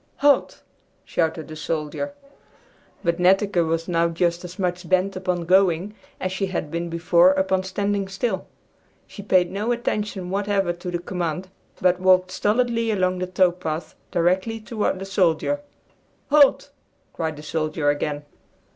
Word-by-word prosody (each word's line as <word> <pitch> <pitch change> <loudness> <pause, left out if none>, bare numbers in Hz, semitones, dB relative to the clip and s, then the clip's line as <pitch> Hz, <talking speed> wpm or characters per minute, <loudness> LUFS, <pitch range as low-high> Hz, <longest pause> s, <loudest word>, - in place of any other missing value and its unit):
"Halt!" 285 0 +2 0.4
shouted 160 -2 -1
the 155 - -8
soldier. 155 - -3 0.9
But 170 -1 0
Netteke 195 +2 +3
was 165 0 -1
now 170 -1 +2
just 170 +1 0
as 180 +1 -9
much 180 -2 -2
bent 185 +1 +2
upon 180 -2 -2
going 185 +1 +3 0.3
as 185 - -2
she 190 +1 -1
had 175 -5 -4
been 170 +1 -3
before 170 +2 +4
upon 190 0 +1
standing 200 +1 -1
still. 195 +1 -2 0.6
She 205 - -10
paid 185 -3 +2
no 210 +5 -1
attention 210 -6 -2
whatever 195 -2 0
to 175 +1 -7
the 175 - -1
command, 175 0 -4 0.3
but 180 0 +3
walked 185 0 +4
stolidly 230 +2 +1
along 185 -3 +1
the 185 - -2
tow 185 0 +3
path 170 -2 -5 0.2
directly 185 +6 +1
toward 215 -3 -2
the 190 - -6
soldier. 195 - +1 0.7
"Halt!" 290 -2 +5 0.4
cried 160 -2 -3
the 150 - -10
soldier 155 -1 0
again. 145 0 -3
185 Hz, 145 wpm, -23 LUFS, 170-195 Hz, 0.9 s, Halt